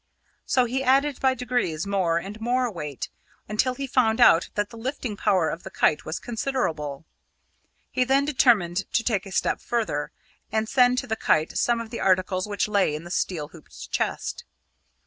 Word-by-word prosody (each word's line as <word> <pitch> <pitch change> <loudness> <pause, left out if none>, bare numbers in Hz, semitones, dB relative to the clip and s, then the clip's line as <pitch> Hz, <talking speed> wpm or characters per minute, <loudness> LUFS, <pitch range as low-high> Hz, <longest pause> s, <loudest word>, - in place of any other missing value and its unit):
So 255 -1 +3
he 255 +3 -1
added 270 +2 +2
by 265 -1 +2
degrees 230 -10 -1
more 190 -4 +1
and 200 +5 -6
more 245 +1 +1
weight, 150 -7 -6 0.4
until 250 +5 0
he 275 - -4
found 240 -4 +2
out 175 -8 +6
that 205 +1 -1
the - - -10
lifting 250 -2 -4
power 190 -5 +2
of 165 - -6
the - - -8
kite 150 - +1
was 155 - -3
considerable. 165 - -3 0.9
He 255 - +2
then 270 +2 +2
determined 210 - +2
to 230 - +2
take 210 -5 -1
a - - -10
step - - 0
further, 235 -2 -2 0.4
and 220 0 0
send 250 0 +4
to 265 - -1
the 220 -3 -2
kite 155 -7 +1
some 240 -1 +2
of 230 -1 -7
the 235 - -5
articles 185 0 +1
which 205 0 -1
lay 200 -7 +2
in 155 - -6
the 175 - -9
steel 160 -6 -2
hooped 160 -1 -12
chest. - - -2
220 Hz, 185 wpm, -25 LUFS, 180-250 Hz, 0.9 s, out